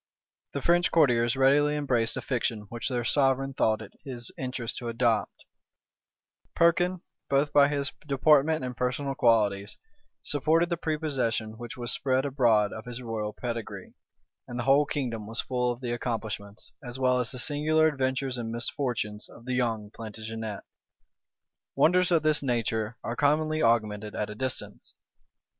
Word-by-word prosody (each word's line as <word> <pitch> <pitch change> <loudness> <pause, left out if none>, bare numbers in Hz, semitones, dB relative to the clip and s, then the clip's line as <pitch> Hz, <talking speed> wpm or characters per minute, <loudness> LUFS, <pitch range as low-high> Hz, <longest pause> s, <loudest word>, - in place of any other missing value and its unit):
The 140 - -3
French 175 +1 +3
courtiers 120 -6 +3
readily 145 +3 +4
embraced 125 -6 0
a - - -4
fiction 120 -4 -1
which 120 +3 -4
their 120 -2 -2
sovereign 135 +1 +2
thought 110 -3 +1
it 105 - -12
his 120 -4 -8
interest 125 -3 -4
to 120 - -6
adopt: 115 -1 0 1.1
Perkin, 175 +2 +3 0.3
both 140 +1 +2
by 145 -1 +7
his 140 -1 -2 0.2
deportment 150 +1 +3
and 125 -1 -5
personal 125 +3 -1
qualities, 105 -5 +2 0.5
supported 160 +4 +2
the 170 - +1
prepossession 130 -9 -1
which 120 0 -7
was 120 -1 0
spread 130 0 +1
abroad 120 -7 +3
of 110 - -8
his 125 0 -6
royal 110 -2 -3
pedigree: 115 -1 -6 0.5
and 120 - -6
the 120 - -2
whole 140 +3 +4
kingdom 120 -8 -3
was 115 +2 -2
full 125 -1 0
of 120 +1 -7
the 120 -2 -3
accomplishments, 110 -4 -5
as 120 0 -7
well 130 -1 +2
as 125 - -1
the 130 - -5
singular 155 +4 +2
adventures 130 -3 -1
and 115 -1 -4
misfortunes, 115 -3 -3
of 115 - -15
the 130 - -2
young 115 -5 -1
Plantagenet. 110 -1 -6 1.1
Wonders 180 +2 +4
of 165 -3 +3
this 155 -1 +2
nature 115 -3 -1
are 115 +2 -3
commonly 155 +3 +2
augmented 110 -2 +1
at 105 0 -2
a - - -5
distance. 130 +4 -5
125 Hz, 155 wpm, -28 LUFS, 115-140 Hz, 1.1 s, by